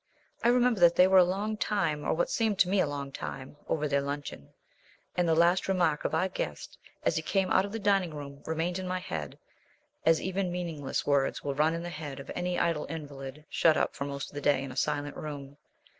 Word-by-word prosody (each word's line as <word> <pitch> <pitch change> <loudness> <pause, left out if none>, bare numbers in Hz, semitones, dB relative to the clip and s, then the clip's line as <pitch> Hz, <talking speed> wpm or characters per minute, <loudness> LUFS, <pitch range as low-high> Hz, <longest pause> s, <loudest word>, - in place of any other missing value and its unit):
I - - +4
remember 245 -2 +4
that 175 -1 +6
they 180 - +7
were 190 0 +6
a - - +8
long 200 +4 -1
time, 165 -9 0
or - - +1
what 175 - 0
seemed 220 -3 +1
to 185 - +4
me 195 +2 +2
a - - +3
long 140 -1 -4
time, 135 0 -7
over 150 -1 0
their 140 -1 +1
luncheon; 140 - -5 0.6
and 175 -1 +2
the 160 - +4
last 175 +3 +3
remark 175 -6 +1
of - - 0
our 180 +4 +2
guest 190 - -5 0.2
as - - +1
he - - 0
came 195 -2 0
out 190 - +4
of 200 - -7
the 225 - -3
dining 195 -4 +2
room 140 -1 -8
remained 165 +3 -1
in 185 - -4
my 185 0 -1
head 80 - -5 0.7
as 165 0 +4
even 190 0 -2
meaningless 165 -6 -3
words 140 -2 +1
will 140 - -1
run 155 +4 +2
in 170 - -4
the 175 - -4
head 150 -4 -6
of 135 - -8
any 180 0 -2
idle 165 -3 +1
invalid 145 -2 -7
shut 160 -2 +3
up - - +1
for 140 - -3
most 140 -1 -5
of - - -22
the 145 - -5
day 140 -1 +2
in 135 - -6
a - - -9
silent 145 +2 -1
room. 145 -2 -7
160 Hz, 235 wpm, -29 LUFS, 145-185 Hz, 0.7 s, a